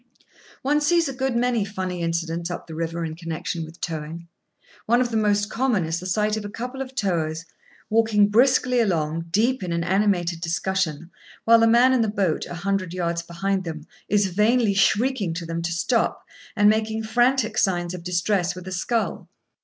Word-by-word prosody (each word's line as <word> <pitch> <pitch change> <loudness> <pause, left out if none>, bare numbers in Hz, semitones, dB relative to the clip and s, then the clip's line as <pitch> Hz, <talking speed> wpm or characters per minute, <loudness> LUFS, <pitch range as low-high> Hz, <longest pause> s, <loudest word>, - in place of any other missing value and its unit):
One 295 +3 +2
sees 335 +2 +3
a 275 - -4
good 265 -1 -1
many 240 -2 +1
funny 185 -3 -4
incidents 170 0 -2
up 175 - -5
the 160 - -10
river 165 +1 -3
in 160 - -5
connection 165 0 -4
with 160 +2 -11
towing. 165 +1 -5 0.6
One 240 +2 +4
of 245 -1 0
the - - -2
most 205 -1 +2
common 230 -6 0
is 165 +1 -2
the 185 - -6
sight 210 +3 +1
of 220 - -4
a 205 - -6
couple 250 +5 -6
of 265 0 -7
towers, 165 -5 -1 0.4
walking 215 -2 +3
briskly 250 +2 +3
along, 165 -6 0
deep 230 +8 +1
in 180 -2 -4
an 170 0 -1
animated 180 -2 +1
discussion, 170 -1 -2 0.3
while 230 0 +7
the 230 - +4
man 240 +3 +5
in 255 - +3
the 225 - +1
boat, 195 -6 -1
a - - -7
hundred 185 -1 -2
yards 170 -1 -1
behind 190 +3 -2
them, 160 -3 -6 0.2
is 205 -1 +3
vainly 210 +4 +2
shrieking 205 -1 +1
to 170 0 -5
them 165 0 -3
to 170 +1 -2
stop, 225 +8 0 0.3
and 205 -1 +4
making 220 +1 +1
frantic 240 0 +2
signs 175 -3 0
of 180 -2 -7
distress 180 +1 0
with 185 0 -9
a - - -5
scull. 220 +6 -2
195 Hz, 190 wpm, -23 LUFS, 170-225 Hz, 0.6 s, while